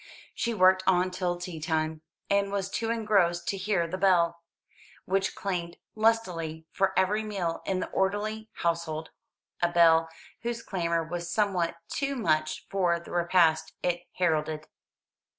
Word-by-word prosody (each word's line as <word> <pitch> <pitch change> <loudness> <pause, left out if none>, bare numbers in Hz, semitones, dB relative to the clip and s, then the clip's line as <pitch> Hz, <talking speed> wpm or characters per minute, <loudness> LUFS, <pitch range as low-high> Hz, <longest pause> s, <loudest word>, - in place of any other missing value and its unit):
She 235 -1 -1
worked 185 -1 +5
on 185 0 +3
till 180 -1 -1
tea 175 -2 -6
time, 155 0 -1 0.3
and 200 0 +1
was 195 -1 -2
too 225 - -2
engrossed 200 -7 +2
to - - 0
hear 190 -2 0
the 185 +3 -4
bell, 170 -3 +3 0.6
which 195 +1 0
clanged 175 -3 -3 0.2
lustily 180 -8 0
for 190 -1 0
every 195 +3 +2
meal 195 -6 -3
in 185 -1 0
the - - -4
orderly 215 +3 -1
household: 165 -2 -2 0.5
a 175 - +3
bell 165 -1 +5 0.3
whose 235 -1 -3
clamour 170 -3 -1
was 170 +1 -5
somewhat 185 -6 +1
too 275 -1 -2
much 155 -10 0
for 180 -3 +1
the 170 - -12
repast 170 -2 +3
it 175 0 -1
heralded. 155 -3 0
180 Hz, 145 wpm, -28 LUFS, 170-200 Hz, 0.6 s, worked